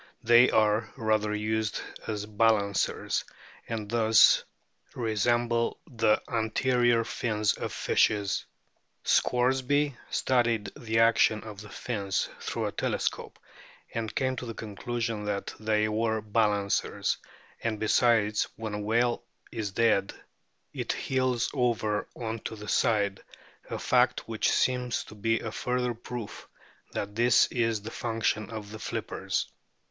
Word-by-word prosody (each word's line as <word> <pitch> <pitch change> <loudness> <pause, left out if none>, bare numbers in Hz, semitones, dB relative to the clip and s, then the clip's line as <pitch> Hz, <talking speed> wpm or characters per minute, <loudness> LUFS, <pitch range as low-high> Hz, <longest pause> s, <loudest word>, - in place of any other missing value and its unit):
They 120 +2 +7
are 110 +1 +2
rather 110 -2 +1
used 110 0 -1 0.3
as 105 -1 -3
balancers, 105 -2 +1 0.4
and 110 -2 -4
thus 110 0 +5 0.5
resemble 115 +1 +1
the 115 -8 +2
anterior 120 +1 +2
fins 110 -2 0
of - - -5
fishes. 100 -2 +1 0.6
Scoresby 130 +3 +2
studied 115 -5 +1
the 110 -1 -2
action 115 -1 +4
of 105 -2 -9
the 105 - -11
fins 100 -5 -2
through - - -3
a - - -2
telescope, - - -2 0.6
and 110 -2 -3
came 130 -1 0
to 120 - -5
the 115 - -6
conclusion 115 +1 -3
that 100 -1 -3
they 110 0 +1
were 110 +1 0
balancers; 105 -2 0 0.4
and 110 -2 -1
besides, 110 -1 +3
when 110 -2 -5
a 105 - -3
whale 120 +3 +1 0.3
is 105 -3 -3
dead 110 -2 +2 0.6
it - - -2
heels 130 -2 0
over 115 -5 0
on 115 -1 -4
to 110 - -6
the 105 0 -9
side, 100 -2 +1 0.5
a - - -3
fact - - +2
which - - 0
seems 125 -2 +1
to - - -13
be 115 +2 0
a 110 - -4
further 125 +1 -1
proof 120 -1 -8 0.4
that 100 0 -4
this 120 +2 +5
is 115 -4 0
the 110 - -6
function 115 -3 -1
of 110 -2 -7
the 110 - -8
flippers. - - -3
110 Hz, 130 wpm, -28 LUFS, 105-120 Hz, 0.6 s, They